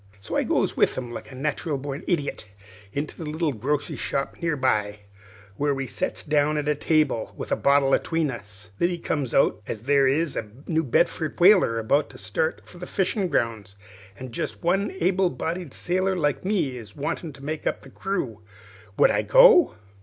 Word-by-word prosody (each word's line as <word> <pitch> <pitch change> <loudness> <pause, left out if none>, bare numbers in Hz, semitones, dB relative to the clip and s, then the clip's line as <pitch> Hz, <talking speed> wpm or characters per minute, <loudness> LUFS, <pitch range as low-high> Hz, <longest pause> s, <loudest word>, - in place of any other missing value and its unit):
"So 100 - -6
I - - +3
goes - - 0
with - - +2
him 125 -2 -4
like 120 - -8
a - - -10
nat'ral 150 +2 -2
born 140 +3 -5
idiot, 145 - -1 0.4
into 145 +8 -4
a - - -3
little 155 0 -1
grocery 140 +6 -2
shop 140 0 -2
near 165 -3 0
by, 105 -5 0 0.6
where 145 -1 +1
we 135 0 -3
sets - - -3
down 150 0 +2
at 150 -1 -2
a 150 - +3
table 150 -5 0
with - - -6
a - - +4
bottle 140 -1 +3
atween 165 -4 +1
us. 105 -3 -10
Then 175 - +3
it 175 -2 -5
comes 140 -6 -1
out 135 - +3
as 105 - -4
there 140 +1 +4
is 150 +3 +1
a 110 - -4 0.2
New 160 -1 0
Bedford 160 +4 0
whaler 180 - +6
about 140 +7 +1
to - - -13
start 100 +11 -1
for 175 - -14
the 180 - -7
fishin' 190 0 0
grounds, 110 - -2 0.4
an' 130 +2 -8
jest 155 +5 -5
one 195 +4 +2
able 185 +1 +2
bodied 165 +4 -4
sailor 185 +4 0
like 150 -5 0
me 175 -10 0
is 110 -4 -11
wanted 150 +1 -4
to 140 - -12
make 155 +1 -3
up - - -2
the 135 - -13
crew. 135 - -3 0.6
Would - - +6
I - - +2
go? - - +6
145 Hz, 195 wpm, -25 LUFS, 130-170 Hz, 0.6 s, whaler